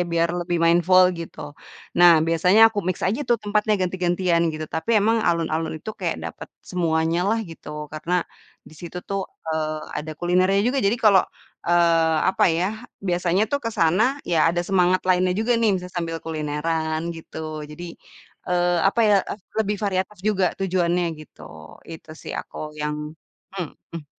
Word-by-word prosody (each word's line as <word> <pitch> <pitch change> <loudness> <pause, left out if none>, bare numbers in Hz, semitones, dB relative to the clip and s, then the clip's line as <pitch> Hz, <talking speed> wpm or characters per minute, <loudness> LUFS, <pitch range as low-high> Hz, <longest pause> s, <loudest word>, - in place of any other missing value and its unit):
biar 170 0 +2
lebih 175 0 -1
mindful 175 +2 +5 0.2
gitu. 165 - -9 0.6
Nah, 175 0 +9 0.2
biasanya 180 +5 +3
aku 210 - -4
mix 185 -2 0
aja 205 +9 0
tuh 240 - +4
tempatnya 210 +1 +1
ganti-gantian 180 -1 +1
gitu, 155 0 -5
tapi 160 +8 +1
emang 225 +3 +3
alun-alun 160 -1 -1
itu 185 +7 -7
kayak - - -1
dapet - - -7 0.2
semuanya 165 -1 0
lah, 225 - +2
gitu. 165 -4 -12 0.2
Karena 170 +3 -1 0.5
di - - -15
situ 175 +1 -7
tuh, 195 0 -1 0.3
eee, 155 -1 -2 0.2
ada 155 +1 -7
kulinernya 185 +3 +2
juga 255 +3 +1
jadi 210 +1 +2
kalau, 200 -3 +7 0.5
eee, 165 -2 +3
apa 190 - +2
ya, 180 - +1 0.4
biasanya 180 +2 +1
tuh 285 - +2
ke 230 - -1
sana 170 +5 +3 0.3
ya 170 - +2
ada 170 +1 0
semangat 185 -1 +3
lainnya 180 0 +3
juga 240 +2 +1
nih, 225 -2 +3
bisa 180 0 -7
sambil 165 -1 -2
kulineran, 160 0 -2 0.2
gitu. 160 - -10 0.3
Jadi, 165 +4 -8 0.6
eee, 175 -1 +2
apa 235 - 0
ya, 205 - +5 0.2
ef 205 - -9 0.2
lebih 210 -1 -1
variatif 190 0 -2
juga 195 -3 +1 0.2
tujuannya 180 -2 +1 0.2
gitu, 155 - -15 0.5
itu 160 -1 -10
sih - - -6
aku - - -12 0.2
yang 150 0 -1 0.6
mhm. 165 -2 -7
175 Hz, 160 wpm, -23 LUFS, 165-190 Hz, 0.6 s, Nah